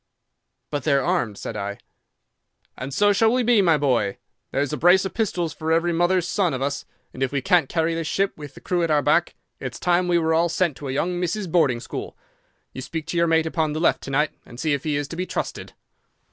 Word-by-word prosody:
"'"But 145 -3 -2
they 145 - +2
are 140 -1 +3
armed," 110 -4 0
said - - -6
I. 100 0 -4 1.0
"'"And 130 +2 -6
so 205 +8 +3
shall 220 +3 +3
we 250 +1 +2
be, 235 -3 +4
my 165 -5 +4
boy. 125 -9 +1 0.3
There's 140 +2 -1
a - - -1
brace 180 +6 +5
of 190 - -4
pistols 180 -8 -1
for 160 +1 -3
every 170 +1 +2
mother's 175 +1 +2
son 180 -8 +1
of 130 - -5
us, 140 0 -2 0.3
and 130 - -9
if 135 - +1
we 140 - 0
can't 175 -3 +2
carry 165 0 0
this 165 -1 -3
ship, 195 +4 0
with 145 -3 -10
the - - -12
crew 180 -1 0
at 165 - 0
our 150 -2 +3
back, - - +2 0.2
it's - - -6
time 180 +1 +2
we 175 -1 +3
were 160 -1 +1
all 170 +1 +3
sent 170 -3 0
to 145 - -7
a - - -2
young 175 +6 -1
misses' 180 +4 -2
boarding 155 -8 +2
school. 120 - -7 0.6
You 130 - -6
speak 160 +3 -5
to 175 - -2
your 170 0 +3
mate 160 0 +3
upon 160 -1 -1
the 155 - -2
left 170 - +2
to - - -8
night, 145 +3 +1
and 120 - -13
see 155 0 +1
if 140 +1 -3
he 150 -2 0
is 145 -1 -2
to - - -6
be 180 +2 -3
trusted." - - -4
160 Hz, 245 wpm, -23 LUFS, 140-175 Hz, 1.0 s, brace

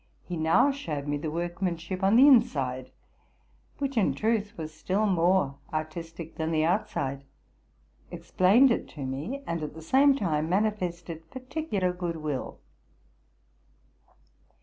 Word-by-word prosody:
He 180 - -4
now 165 - +3
showed 155 - -5
me 145 0 0
the 155 +2 -4
workmanship 175 +2 -3
on 195 +3 +4
the 265 +4 +8
inside, 135 - +3 0.9
which 275 -2 -3
in 210 - +2
truth 220 -1 -1
was 155 -1 -6
still 190 +7 -1
more 175 -6 +2
artistic 165 +1 -6
than 160 0 -1
the 155 -1 +1
outside, 140 -7 -1 0.9
explained 225 +9 +4
it - - -1
to 140 -3 -5
me, 150 - -4
and 170 -6 -3
at 150 0 -5
the 160 - -9
same 275 - +4
time 160 - -1
manifested 175 -5 -2
particular 255 - -2
good 175 -2 -3
will. 150 -4 -4
175 Hz, 130 wpm, -27 LUFS, 155-215 Hz, 0.9 s, the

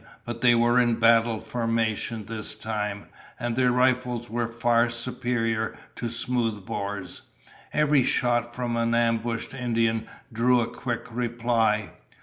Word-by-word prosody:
But 120 -1 -5
they 120 -1 +6
were 120 +1 +4
in 120 -2 +3
battle 115 -1 +4
formation 115 -2 -1
this 110 0 -1
time, 105 -2 -3 0.3
and 120 -1 -2
their 125 0 +3
rifles 125 -2 +1
were 120 0 -1
far 115 0 +2
superior 115 -2 -1 0.2
to 120 - -3
smoothbores. 105 -5 -3 0.5
Every 150 -3 +3
shot 120 -1 +1
from 120 -2 -2
an 115 0 +1
ambushed 115 0 0
Indian 115 -3 0 0.3
drew 125 +2 +3
a 115 - +1
quick 120 -2 -4
reply. 115 -2 0
115 Hz, 130 wpm, -26 LUFS, 115-120 Hz, 0.5 s, they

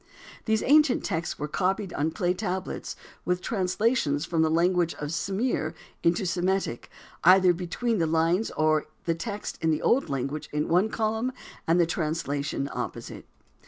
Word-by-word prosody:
These 220 -1 +1
ancient 300 -2 +4
texts 165 -3 -2
were 150 - -3
copied 190 +4 -1
on 150 +3 0
clay 180 +1 0
tablets 185 -1 -4 0.3
with 180 0 0
translations 185 - 0
from 165 -1 0
the 160 - +3
language 170 +1 +2
of 150 0 -5
Sumir 190 0 -1 0.3
into 170 +3 +2
Semitic, 185 -7 -1 0.3
either 185 0 +7
between 190 +6 -2
the 165 - +2
lines 165 +6 +2
or 155 -1 +2 0.2
the 165 - +2
text 205 +5 -5
in 160 - +2
the 155 - 0
old 265 +3 +2
language 140 +2 -3
in 150 0 -1
one 180 +6 +3
column 220 +3 -1 0.4
and 165 +2 +4
the 170 - +5
translation 150 -4 -2
opposite. - - -6
175 Hz, 155 wpm, -27 LUFS, 160-195 Hz, 0.4 s, either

